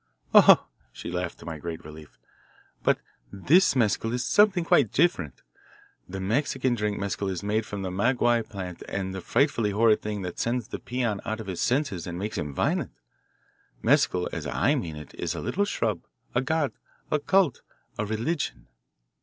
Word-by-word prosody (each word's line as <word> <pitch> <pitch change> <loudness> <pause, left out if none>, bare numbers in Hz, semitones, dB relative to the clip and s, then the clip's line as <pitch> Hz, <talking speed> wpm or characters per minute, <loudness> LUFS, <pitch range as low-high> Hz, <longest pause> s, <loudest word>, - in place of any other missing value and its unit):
"Oh," - - +8 0.3
she - - -7
laughed, 90 0 -3
to - - -11
my 80 -2 -6
great 80 0 -6
relief, 75 0 -12 0.6
"but - - +3 0.3
this 155 - +4
mescal 115 -1 +1
is 125 +1 -1
something 205 -4 +4
quite 135 -9 +4
different. 115 - +1 0.7
The 95 +1 -5
Mexican 125 +5 0
drink 105 -3 -1
mescal 100 0 -2
is 95 -1 -4
made 105 +1 0
from 100 -1 -5
the 95 - -3
maguey 120 +4 +2
plant 95 -4 -6
and 95 -1 -2
is 95 - -5
a - - -5
frightfully 120 - +1
horrid 110 +1 +3
thing 105 -2 -4
that 90 -1 -6
sends 120 -1 -1
the - - -5
peon 120 -5 -2
out 110 +1 -3
of 110 - -6
his 95 -3 -4
senses 120 - 0
and 85 0 -5
makes 105 +4 -3
him 75 -2 -3
violent. - - -1 0.9
Mescal 90 -1 +3
as - - -4
I 80 - +2
mean 90 - -3
it 75 0 -10
is - - -2
a - - -4
little 200 +2 0
shrub, - - -1 0.3
a 125 - +2
god, 145 +1 0 0.4
a 150 - +2
cult, 185 -2 +2 0.4
a - - +1
religion." 115 - -2
105 Hz, 180 wpm, -26 LUFS, 95-130 Hz, 0.9 s, Oh